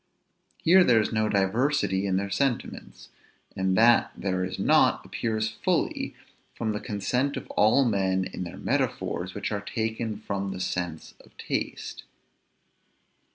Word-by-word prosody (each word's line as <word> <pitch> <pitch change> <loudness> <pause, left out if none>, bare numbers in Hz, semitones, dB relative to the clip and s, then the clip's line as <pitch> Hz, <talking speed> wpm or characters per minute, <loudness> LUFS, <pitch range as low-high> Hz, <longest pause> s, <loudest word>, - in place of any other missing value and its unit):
Here 185 +3 +6
there 120 -8 +5
is 105 - 0
no 110 0 +1
diversity 100 0 +1
in 95 - +1
their 100 +1 -2
sentiments; 130 +5 -2 0.5
and 95 0 +1
that 115 +1 +5
there 95 -1 -1
is 95 - -4
not, - - +3
appears 110 -1 -2
fully 110 - -1 0.4
from 110 -2 -2
the 105 - -3
consent 125 +7 -1
of - - -6
all 110 +6 +4
men 95 -4 +1
in 95 - -5
the 85 - -8
metaphors 90 +1 -2
which 100 - -3
are 105 -1 -2
taken, 110 0 -3
from 100 -1 -3
the 95 - -5
souse 90 -3 -4
of - - -23
taste. - - -4
105 Hz, 145 wpm, -27 LUFS, 95-115 Hz, 0.5 s, Here